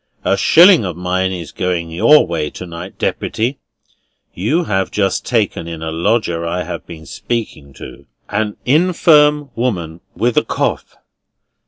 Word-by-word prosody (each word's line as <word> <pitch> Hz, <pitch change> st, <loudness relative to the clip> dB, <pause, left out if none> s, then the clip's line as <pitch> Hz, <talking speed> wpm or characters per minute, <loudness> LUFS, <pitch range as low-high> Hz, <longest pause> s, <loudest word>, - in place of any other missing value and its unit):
A -, -, +3 dB
shilling 170 Hz, -, +6 dB
of 90 Hz, -4 st, -4 dB
mine 90 Hz, +1 st, -1 dB
is 85 Hz, -5 st, -6 dB
going 85 Hz, -2 st, -2 dB
your 150 Hz, -, +5 dB
way 80 Hz, -3 st, -3 dB
to 90 Hz, -, -9 dB
night, 85 Hz, +2 st, -9 dB
Deputy. 120 Hz, +5 st, -2 dB, 0.7 s
You 140 Hz, -, 0 dB
have 95 Hz, -, -1 dB
just 100 Hz, -2 st, -1 dB
taken 105 Hz, -8 st, -1 dB
in 80 Hz, -1 st, -7 dB
a 80 Hz, -, -3 dB
lodger 85 Hz, 0 st, 0 dB
I 85 Hz, +2 st, -2 dB
have -, -, -7 dB
been 80 Hz, -2 st, -10 dB
speaking 90 Hz, -, -5 dB
to; 70 Hz, +1 st, -12 dB, 0.2 s
an 105 Hz, 0 st, -2 dB
infirm 150 Hz, -2 st, +3 dB
woman 90 Hz, -9 st, -3 dB
with 120 Hz, 0 st, 0 dB
a -, -, +4 dB
cough." -, -, -3 dB
95 Hz, 150 wpm, -17 LUFS, 85-120 Hz, 0.7 s, shilling